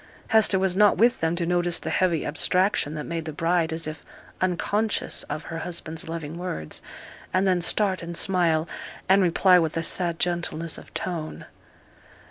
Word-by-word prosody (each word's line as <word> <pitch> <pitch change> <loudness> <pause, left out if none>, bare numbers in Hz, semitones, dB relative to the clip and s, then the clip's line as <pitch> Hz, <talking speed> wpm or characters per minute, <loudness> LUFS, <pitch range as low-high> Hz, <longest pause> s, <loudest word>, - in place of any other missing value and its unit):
Hester 220 -3 +5
was 190 -1 +1
not 210 +1 +5
with 240 +3 +4
them 165 +1 0
to 170 -1 -1
notice 175 0 +1
the - - -4
heavy 175 -4 +1
abstraction 180 0 +1
that 150 - -4
made 165 0 -4
the 160 - -4
bride 165 +2 +1
as 165 0 -4
if 155 0 -6 0.4
unconscious 200 +4 0
of 150 +1 -4
her 165 - -6
husband's 165 -1 -5
loving 165 0 -5
words, 80 - -4 0.5
and 185 +1 +2
then 185 -2 +2
start 190 +1 +1
and 170 0 -5
smile, 170 -4 +2 0.4
and 195 +1 +5
reply 180 +1 +5
with 160 -1 -1
a 165 - 0
sad 170 0 -1
gentleness 170 -2 -2
of - - -15
tone. 165 -4 -4
170 Hz, 170 wpm, -25 LUFS, 160-185 Hz, 0.5 s, Hester